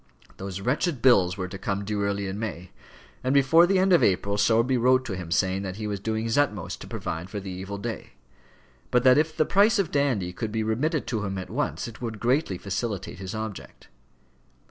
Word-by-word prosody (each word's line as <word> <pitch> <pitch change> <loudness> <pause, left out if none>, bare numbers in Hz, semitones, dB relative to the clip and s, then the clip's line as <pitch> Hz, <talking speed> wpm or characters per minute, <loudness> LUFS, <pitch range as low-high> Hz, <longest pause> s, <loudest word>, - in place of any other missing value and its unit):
Those 95 0 -6
wretched 140 - 0
bills 95 -8 +5
were 95 -1 -3
to 95 +1 -8
come 100 +1 -2
due 105 0 -2
early 100 0 -1
in 95 +2 -4
May, 95 -5 -5 0.5
and 130 +2 +1
before 160 +5 +6
the 195 +1 +2
end 190 0 +3
of 175 - +6
April 100 +1 +2
Sowerby 115 +5 +3
wrote 130 +2 +3
to 100 - -4
him 90 -3 -7
saying 95 +2 +1
that 95 -2 -5
he 110 +1 -5
was 100 -2 -3
doing 110 +2 -2
his 115 +4 +1
utmost 105 - -1
to - - -8
provide 85 +3 -5
for 105 - -4
the 95 -1 -7
evil 95 +2 -6
day; 100 - -6 0.8
but 125 - +2
that 130 +2 +6
if 155 +1 -1
the 155 - +3
price 205 +7 +4
of 195 -6 0
Dandy 125 -11 0
could 110 +3 -4
be 110 0 -1
remitted 130 +6 0
to 110 -3 -2
him 95 -1 -3
at 95 +1 -6
once, 140 +1 -2
it 115 - -11
would 115 -3 -4
greatly 125 - +1
facilitate 100 -1 -4
his 95 +2 -6
object. 110 -2 -7
110 Hz, 215 wpm, -26 LUFS, 95-130 Hz, 0.8 s, before